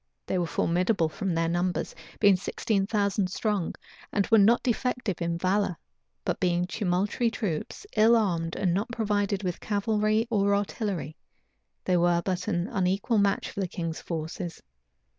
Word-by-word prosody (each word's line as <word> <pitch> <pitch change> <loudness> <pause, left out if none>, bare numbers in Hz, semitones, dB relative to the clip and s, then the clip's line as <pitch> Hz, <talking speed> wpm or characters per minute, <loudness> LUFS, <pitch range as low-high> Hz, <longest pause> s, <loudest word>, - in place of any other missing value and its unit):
They 185 - -1
were 175 - 0
formidable 175 +1 +1
from 180 +2 -2
their 165 0 +1
numbers, 175 +1 -1 0.3
being 200 -2 +6
sixteen 195 +1 -1
thousand 200 -3 +1
strong, 205 -2 -1 0.4
and 200 - +1
were 225 - +7
not 220 +4 +5
defective 245 -5 -1
in 170 0 -1
valor; 185 0 +1 0.5
but - - -1
being 175 -1 +1
tumultuary 200 +5 0
troops, 205 - -4
ill 225 +2 +6
armed, 170 -7 0
and 180 -3 +1
not 205 +7 -1
provided 205 -3 0
with 180 -2 -2
cavalry 215 +1 +1
or 200 -2 +3
artillery, 195 - -3 0.7
they 180 -1 +3
were 175 0 +3
but 185 0 -2
an 175 -3 0
unequal 200 +1 +1
match 200 0 +1
for - - -6
the 190 - 0
king's 165 -2 -4
forces. 165 +1 -5
195 Hz, 155 wpm, -27 LUFS, 175-210 Hz, 0.7 s, were